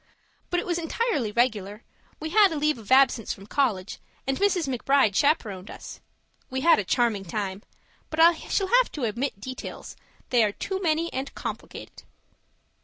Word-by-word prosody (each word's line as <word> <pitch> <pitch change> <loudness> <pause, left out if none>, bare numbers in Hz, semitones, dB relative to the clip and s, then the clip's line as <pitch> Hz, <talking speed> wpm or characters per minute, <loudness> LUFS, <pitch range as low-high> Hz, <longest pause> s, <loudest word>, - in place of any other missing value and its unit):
But 355 - +1
it - - -4
was 345 -1 -1
entirely 330 - -1
regular; 215 -3 -1 0.4
we 315 +1 -5
had 415 +1 +6
leave 300 -4 0
of 215 0 -12
absence 260 -4 +4
from 195 - -7
college, 210 -6 -1 0.3
and 270 +1 0
Mrs. 370 -6 +2
McBride 265 -3 +2
chaperoned 210 - 0
us. - - -10 0.5
We 260 0 -3
had 335 -5 +5
a - - 0
charming 225 -1 +1
time 195 +1 -4 0.5
but 315 - -5
I 335 +1 +8
shall 380 +4 -2
have - - +1
to 280 -5 -2
omit 235 +1 -3
details; 255 +5 -8 0.4
they 240 -3 +5
are 210 -1 +1
too 385 - -4
many 330 -1 0
and 265 +1 -4
complicated. - - -7
265 Hz, 165 wpm, -26 LUFS, 215-325 Hz, 0.5 s, I